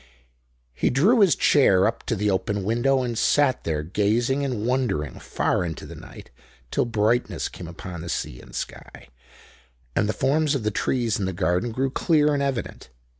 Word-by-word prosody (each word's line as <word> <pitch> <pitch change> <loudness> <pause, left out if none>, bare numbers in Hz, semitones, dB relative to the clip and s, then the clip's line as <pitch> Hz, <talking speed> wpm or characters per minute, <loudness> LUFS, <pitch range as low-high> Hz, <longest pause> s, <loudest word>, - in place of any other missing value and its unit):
He - - +1
drew 195 - +4
his 195 -6 +5
chair 95 -10 +4
up 115 - -1
to 115 - 0
the 105 0 0
open 100 +1 -1
window 120 +5 +1
and 120 -2 -3
sat 135 +4 +2
there 75 -2 -1
gazing 110 - 0
and 125 -6 -2
wondering 120 - -1
far - - -1
into 80 -3 -5
the - - -9
night, - - -12 0.4
till - - +1
brightness 110 -4 0
came 85 - -9
upon 85 0 -8
the 85 - -7
sea - - -4
and - - -13
sky, - - -7 0.9
and 105 - +1
the - - +1
forms 150 +2 +1
of 130 - -2
the 105 - 0
trees 115 0 0
in 100 - -1
the 95 - -2
garden 90 +6 0
grew 135 +3 -1
clear 150 0 +2
and 140 - 0
evident. 135 - -3
115 Hz, 180 wpm, -24 LUFS, 95-135 Hz, 0.9 s, his